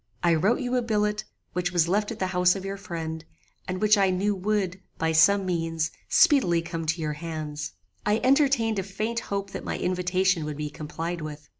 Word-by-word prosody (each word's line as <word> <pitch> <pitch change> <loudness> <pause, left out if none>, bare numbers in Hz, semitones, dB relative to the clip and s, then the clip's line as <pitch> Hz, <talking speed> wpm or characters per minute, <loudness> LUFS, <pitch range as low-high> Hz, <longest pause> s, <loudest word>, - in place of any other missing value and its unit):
"I 170 -1 +4
wrote 195 +11 +2
you 250 0 -1
a - - +2
billet, 210 -2 0 0.3
which 180 0 -1
was 175 -2 +3
left 205 +4 +1
at 225 - -5
the 190 - -1
house 180 +1 +4
of 195 -1 -6
your 195 0 -3
friend, 160 -4 -5 0.4
and 185 0 -3
which 210 0 +4
I 195 -1 +4
knew 195 +3 +1
would, 190 -1 -1 0.2
by 160 0 +1
some 190 +5 +5
means, 165 -2 -1 0.2
speedily 255 - +4
come 165 -1 -5
to 165 +1 0
your 155 -1 -1
hands. 150 -2 -5 0.3
I 210 +1 +2
entertained 265 -6 +3
a - - -1
faint 215 +5 -2
hope 200 0 -2
that - - -6
my - - -3
invitation 185 -1 +1
would 150 -1 -5
be 150 -1 -4
complied 165 +3 -5
with. 150 -1 -8
185 Hz, 200 wpm, -26 LUFS, 165-210 Hz, 0.4 s, some